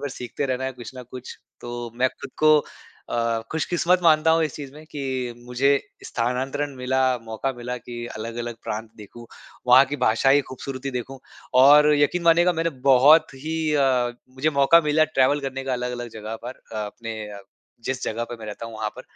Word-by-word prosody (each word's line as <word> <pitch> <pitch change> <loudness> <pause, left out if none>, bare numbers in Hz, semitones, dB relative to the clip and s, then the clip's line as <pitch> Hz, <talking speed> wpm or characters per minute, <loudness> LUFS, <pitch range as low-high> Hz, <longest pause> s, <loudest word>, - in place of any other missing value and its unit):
भर 145 - -3
सीखते 125 +3 -4
रहना 130 0 -2
है 130 - -2
कुछ 120 -3 -10
न 125 - -7
कुछ। 130 -1 -9 0.2
तो 120 -1 -6
मैं 130 +1 +3
खुद - - -11
को 155 0 +6 0.5
अ, 115 -1 0
खुशकिस्मत 175 +3 +1
मानता 160 -1 +5
हूँ 165 - +2
इस 155 - -4
चीज़ 140 -2 -8
में 155 +1 -12
कि 130 -4 -3
मुझे 125 +3 +1 0.4
स्थानांतरण 135 +4 -2
मिला, 130 +1 0 0.2
मौका 110 +4 -3
मिला 125 +1 -5
कि 120 0 -7
अलग-अलग 115 +2 -5
प्रांत 110 +1 -4
देखूँ, 115 +3 -12 0.4
वहाँ 130 +2 +8
की 145 +2 -4
भाषा 125 +1 +2
ही 145 +1 +6
खूबसूरती 130 +1 -6
देखूँ। 130 +2 -5 0.4
और 150 +2 +7
यकीन 145 +5 +1
मानिएगा 170 +2 +5
मैंने 165 0 -1 0.2
बहुत 145 +5 +7
ही 155 +4 -5 0.2
अ, 130 -4 +2 0.2
मुझे 150 +4 +1
मौका 140 +3 +5
मिला 155 +1 +4
ट्रैवल 145 -1 +2
करने 135 -1 -5
का 130 - -2
अलग-अलग 125 -1 -3
जगह 110 +1 -6
पर 130 - -8
अ, - - -5
अपने 115 +1 -7
अ, 100 -1 -9 0.4
जिस 130 -1 -3
जगह 115 +2 -2
पे 120 0 -8
मैं 110 -1 -10
रहता 105 +2 -7
हूँ 115 - -9
वहाँ 110 -1 -2
पर। - - -8
130 Hz, 190 wpm, -23 LUFS, 120-145 Hz, 0.5 s, वहाँ